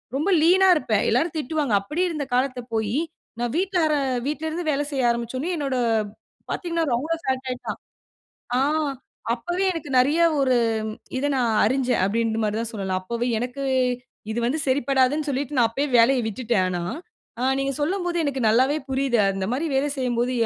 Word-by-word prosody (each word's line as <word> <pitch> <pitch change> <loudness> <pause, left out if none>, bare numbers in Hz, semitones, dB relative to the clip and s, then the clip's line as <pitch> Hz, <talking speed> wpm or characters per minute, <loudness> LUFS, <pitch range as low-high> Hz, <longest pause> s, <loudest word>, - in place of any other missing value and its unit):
ரொம்ப 300 +8 0
லீனா 370 +4 +5
இருப்ப. 255 -7 -3 0.2
எல்லாரும் 285 +8 +1
திட்டுவாங்க. 300 -4 -1
அப்படி 300 - -3
இருந்த 305 -4 -3
காலம் 255 0 +1
போய், 220 +2 0 0.4
நான் 240 0 -1
வீட்டாரா 350 -5 +1 0.3
வீட்லருந்து 315 +3 -3
வேல 290 0 0
செய்ய 260 -4 +2
ஆரம்பிச்சோனே 235 +6 -3
என்னோட 275 -3 -2 0.8
பாத்தீங்கன்னா 335 -2 -1
ரொம்ப 275 +7 -3
ஃபேட் 265 -3 -2
ஆயிட்டான். 250 -1 -5 0.8
ஆ - - +3 0.7
அப்பவே 350 +10 -2
எனக்கு 320 -4 -6
நிறைய 285 +6 +3 0.2
ஒரு 260 -2 +3 0.6
இத 265 - -1
நான் 245 -3 +1
அறிஞ்சேன், 255 0 +1
அப்டிங்கிற 225 +2 0
மாரிதான் 220 +2 -1
சொல்லலாம். 190 -3 -2
அப்பவே 235 +5 -2
எனக்கு 250 +3 -4 0.7
இது 225 - -2
வந்து 270 +7 0
சரிப்படாதுன்னு 270 +2 +2
சொல்லிட்டு 280 +1 -2
நான் 235 -2 +4
அப்பவே 275 +6 -1
வேலைய 250 +2 +5
விட்டுட்டேன் 220 -2 0
ஆனா. 175 -1 -2 0.6
ஆ - - 0 0.2
நீங்க 275 0 0
சொல்லும்போது 350 +2 -1
எனக்கு 275 -2 -2
நல்லாவே 260 +6 +3
புரியுது, 265 -2 +1
அந்த 195 -1 -3
மாரி 285 +6 -1
வேலை 270 +2 +2
செய்யும்போது 245 -1 0
260 Hz, 155 wpm, -24 LUFS, 235-300 Hz, 0.8 s, லீனா